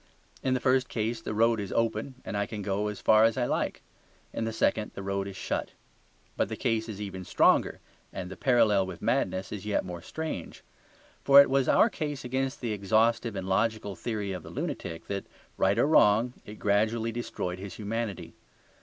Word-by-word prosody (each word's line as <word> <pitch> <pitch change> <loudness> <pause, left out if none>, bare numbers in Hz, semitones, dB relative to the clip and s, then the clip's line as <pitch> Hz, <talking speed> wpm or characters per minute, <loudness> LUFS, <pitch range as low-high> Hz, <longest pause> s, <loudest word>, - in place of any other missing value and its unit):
In 130 -1 +1
the - - 0
first 130 0 +2
case 115 +1 -2
the 105 - -4
road 115 +1 +3
is 100 -2 -4
open 115 +3 -1
and - - -4
I 100 0 0
can 105 -2 -6
go 100 +2 -1
as 105 -1 -5
far 110 0 +5
as 115 +1 +3
I 125 - +1
like; - - -2 0.5
in 115 - -2
the 115 - -2
second 110 -1 0
the 100 - -6
road 100 0 -2
is 100 - -7
shut. - - -3 0.6
But - - 0
the - - -3
case 115 0 -1
is 105 -2 -6
even 95 -3 -5
stronger, - - +3 0.3
and 90 0 -6
the - - -6
parallel 105 -7 +3
with 95 0 -8
madness 95 -6 0
is 105 -3 -5
yet 105 -2 -1
more 90 -2 -6
strange. 155 - -6 0.6
For 140 0 +8
it 140 - +6
was 135 -1 +2
our - - +6
case 145 -4 -4
against 130 +2 -2
the 120 -3 -2
exhaustive 110 +3 +1
and 95 -1 -4
logical 105 +1 0
theory 105 0 -3
of 90 -2 -4
the - - -11
lunatic 80 0 -5
that, 100 -1 -4 0.3
right 95 +1 +2
or - - +4
wrong, 120 -5 +4
it 105 - -8
gradually 110 +3 +1
destroyed 95 -6 -4
his 100 0 -7
humanity. 110 -2 -4
110 Hz, 200 wpm, -28 LUFS, 100-120 Hz, 0.6 s, For